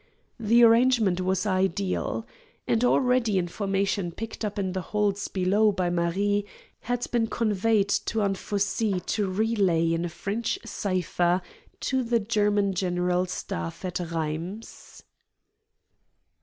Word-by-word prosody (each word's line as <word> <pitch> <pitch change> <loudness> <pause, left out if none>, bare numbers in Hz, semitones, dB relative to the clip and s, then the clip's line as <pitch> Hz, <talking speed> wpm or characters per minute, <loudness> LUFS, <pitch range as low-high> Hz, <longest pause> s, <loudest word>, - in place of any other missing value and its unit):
The 230 +2 +4
arrangement 230 -5 +4
was 185 +2 0
ideal. 190 +2 -1 0.4
And 230 +1 +2
already 250 -4 +3
information 195 0 -1
picked 225 +5 -7
up 210 -1 -3
in 190 -2 -1
the 190 - -2
halls 205 0 -1
below 200 +3 +2
by 180 -3 -1
Marie 195 +4 +1 0.4
had 245 0 -2
been 235 -2 +1
conveyed 215 -2 +1 0.2
to 220 -2 0
Anfossi 200 +1 0
to 200 +2 -1
relay 185 -5 +1
in 165 +1 -1
a 175 - -2
French 210 +7 -2
cipher 180 -2 0 0.4
to 260 -1 0
the 235 -1 +1
German 205 -2 +1
General 180 0 0
Staff 85 - -5
at 180 -1 -3
Rheims. 170 +5 -5
200 Hz, 120 wpm, -26 LUFS, 180-220 Hz, 0.4 s, The